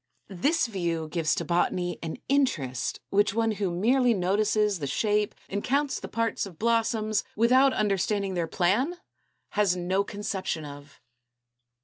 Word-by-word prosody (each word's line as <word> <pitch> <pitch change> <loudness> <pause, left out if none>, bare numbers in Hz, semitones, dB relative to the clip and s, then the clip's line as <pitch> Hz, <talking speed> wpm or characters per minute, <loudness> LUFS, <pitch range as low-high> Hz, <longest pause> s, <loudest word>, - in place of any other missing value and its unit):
This 280 - +1
view 170 -7 -2
gives 160 -2 0
to 170 - -3
Botany 175 +2 0
an 165 -1 -5
interest 155 - 0
which 205 +1 +2
one 225 -1 +2
who 205 -3 -1
merely 235 +7 +2
notices 205 +1 +1
the 140 - -3
shape 210 +6 0
and 200 +1 -3
counts 280 +2 0
the - - -7
parts 230 -3 -1
of 175 -5 -13
blossoms, 225 -1 +1
without 255 +5 +5
understanding 200 -2 0
their 170 -2 -1
plan, 205 - +1 0.5
has 205 -3 +2
no 185 +3 0
conception 195 -6 -4
of. 145 0 -11
200 Hz, 140 wpm, -27 LUFS, 175-230 Hz, 0.5 s, without